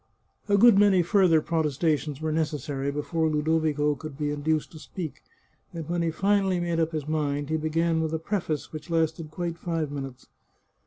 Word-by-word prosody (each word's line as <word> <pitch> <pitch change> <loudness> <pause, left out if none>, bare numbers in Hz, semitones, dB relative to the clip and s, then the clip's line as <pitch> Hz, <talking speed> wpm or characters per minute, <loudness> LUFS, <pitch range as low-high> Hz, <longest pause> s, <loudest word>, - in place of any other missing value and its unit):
A 200 - +5
good 220 -1 +7
many 195 -3 +5
further 175 -3 +4
protestations 150 -2 0
were 155 0 -2
necessary 150 -3 -2
be 145 +1 -3
fore 160 0 0
Ludovico 150 -1 +1
could 145 0 -8
be 150 -1 -1
induced 150 +1 -1
to 155 - -11
speak, 160 -1 -7 0.5
and 165 -3 -5
when 175 0 -1
he 165 - +1
finally 195 +2 +1
made 170 -1 -1
up 165 0 +1
his 155 -3 -4
mind 145 -1 -1
he - - +2
began 160 +1 +1
with 160 -1 -1
a 160 - 0
preface 160 -4 -3
which 155 +2 -8
lasted 160 -1 0
quite 170 +1 -4
five 165 -4 -2
minutes. 135 -3 -7
160 Hz, 180 wpm, -26 LUFS, 150-170 Hz, 0.5 s, good